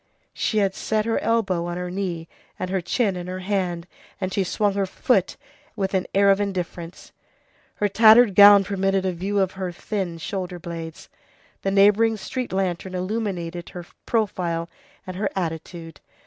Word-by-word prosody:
She 215 - -1
had 195 -2 +2
set 215 +2 -1
her 230 - 0
elbow 195 -7 0
on 175 0 -4
her 180 0 -4
knee 180 -4 -3 0.3
and 185 - -4
her 190 -1 0
chin 200 +2 0
in 180 0 -6
her 185 0 -5
hand, 180 -3 -2 0.3
and 185 -1 -3
she 195 - +1
swung 200 +2 0
her 195 -1 -1
foot 200 - 0 0.4
with 195 -1 -2
an 190 -1 0
air 200 0 +5
of 195 +1 +2
indifference. 180 -3 -5 0.6
Her 210 - +1
tattered 220 +1 +6
gown 200 0 +9
permitted 195 0 0
a 185 - +1
view 190 +4 -3
of 190 -2 +2
her 190 -2 -4
thin 185 -2 -4
shoulder 180 +1 -4
blades. 165 -2 -8 0.5
The 195 - -1
neighboring 210 +3 +4
street 255 +4 -5
lantern 185 -1 -2
illuminated 180 -3 -3
her 175 -2 -8 0.2
profile 175 -7 -1 0.3
and 185 -1 -7
her 205 - 0
attitude. 165 -2 -5
190 Hz, 165 wpm, -23 LUFS, 175-205 Hz, 0.6 s, gown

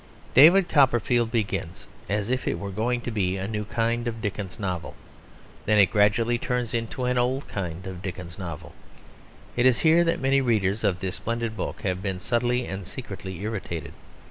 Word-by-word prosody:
David 175 +7 +8
Copperfield 120 -5 +3
begins 100 -6 -2 0.2
as 105 +3 -1
if 130 0 -1
it - - 0
were 100 -1 -5
going 120 +5 -1
to 120 - -4
be 95 -3 0
a 95 +1 -3
new 105 -1 -3
kind 115 +2 -1
of 115 -1 -3
Dickens 105 -3 -4
novel; 90 -7 -4 0.7
then 105 0 +4
it 100 -4 +5
gradually 115 +3 +3
turns 125 -2 -2
into 115 +2 -2
an 125 0 +1
old 130 +3 0
kind 90 -2 -5
of 95 -2 -7
Dickens 90 -1 -7
novel. 85 -5 -7 0.8
It 120 +1 +4
is 125 -2 +3
here 165 +2 +6
that 165 0 +1
many 135 +1 +3
readers 110 -4 +1
of 90 -2 +1
this 95 -2 -3
splendid 115 -1 -3
book 100 - -4
have 95 -1 -1
been 95 -2 -3
subtly 120 +4 0
and 95 -1 -5
secretly 95 -6 -7
irritated. 85 -9 -4
110 Hz, 180 wpm, -26 LUFS, 95-120 Hz, 0.8 s, David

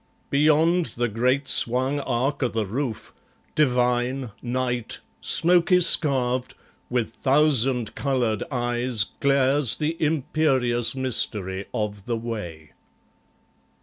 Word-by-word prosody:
Beyond 155 +4 +2
the 120 0 0
great 125 +5 -1
swung 130 +4 +1
arc 135 +2 -2
o' 130 - +1
the 110 -2 -3
roof, 115 +3 -5 0.4
divine, 125 -2 0
Night, 125 -1 -3 0.2
smoky 175 - +4
scarv'd, 130 -7 +5 0.3
with 120 -3 -2
thousand 135 -4 +1
coloured 125 -6 -2
eyes 120 -3 -1 0.2
Glares 140 -1 +2
the 155 +1 -3
imperious 135 -6 0
mystery 100 -7 -2
of 105 -2 -5
the 120 -1 -2
way. 90 -10 -7
125 Hz, 100 wpm, -23 LUFS, 120-140 Hz, 0.4 s, scarv'd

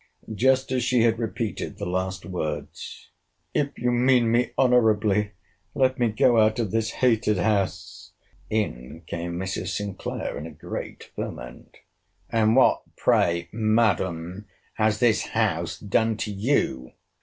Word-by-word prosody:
Just 130 +4 +2
as 130 -2 +1
she 125 -1 +3
had 115 -1 +2
repeated 110 -1 -3
the - - -4
last 95 0 -3
words, 75 -6 -6 0.4
If 140 -1 -1
you 125 +1 0
mean 120 -1 +3
me 120 0 +2
honourably, 110 -5 +3 0.4
let 130 -1 +2
me 120 - +3
go 115 +2 +3
out 110 +1 +3
of 110 -5 -1
this 115 0 0 0.2
hated 110 -3 +2
house, 90 -4 -1 0.4
in 80 - -3
came 85 +1 -4
Mrs. 95 0 -3
Sinclair, 100 -7 -4
in 75 - -6
a - - -10
great 75 - -8
ferment—And 110 - -4
what, 130 - +5 0.2
pray, 85 0 +2
Madam, 100 -4 0 0.3
has 110 -1 +1
this 115 -1 +3
house 95 -7 -1
done 110 +2 0
to 110 -1 -3
you? 100 - -1
110 Hz, 130 wpm, -25 LUFS, 90-115 Hz, 0.4 s, what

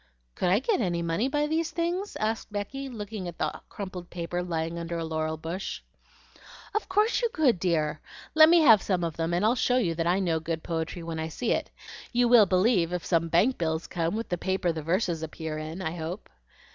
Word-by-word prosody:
"Could 180 - 0
I 190 - +5
get 270 - +1
any 175 -4 0
money 170 +9 0
by 295 +2 +1
these 320 +2 0
things?" 345 +5 -2
asked 220 0 -2
Becky, 270 +7 -4
looking 210 -5 -6
at 170 - -7
the - - -2
crumpled 185 -4 -7
paper 175 0 -3
lying 165 -1 -3
under 170 0 -4
a 165 - -2
laurel 160 0 -2
bush. 170 +5 -5 0.9
"Of 430 - -2
course 420 +6 +2
you 470 - +1
could, 280 - +2
dear! 155 -4 0 0.3
Let 315 0 +8
me 340 0 +6
have 225 -9 +7
some 185 -3 0
of 165 -2 -2
them, 165 0 -1
and 175 +4 +1
I'll 225 - +4
show 250 0 +2
you 180 -10 +1
that 165 0 -1
I 180 +2 +3
know 170 -4 +1
good 160 0 -4
poetry 165 +1 -3
when 165 -1 -4
I 160 - -2
see 220 +9 -2
it. - - 0 0.4
You 245 0 +3
will 235 -4 +7
believe 185 -2 +3
if 180 -1 -3
some 165 -2 +2
bank 205 +11 +3
bills 160 -1 -1
come 170 +1 -2
with 225 +1 -4
the 175 - -2
paper 190 -2 0
the 160 -1 -4
verses 170 +1 0
appear 160 -1 -5
in, 160 +4 -6
I 160 0 -3
hope?" 170 +3 -6
180 Hz, 220 wpm, -27 LUFS, 165-230 Hz, 0.9 s, Let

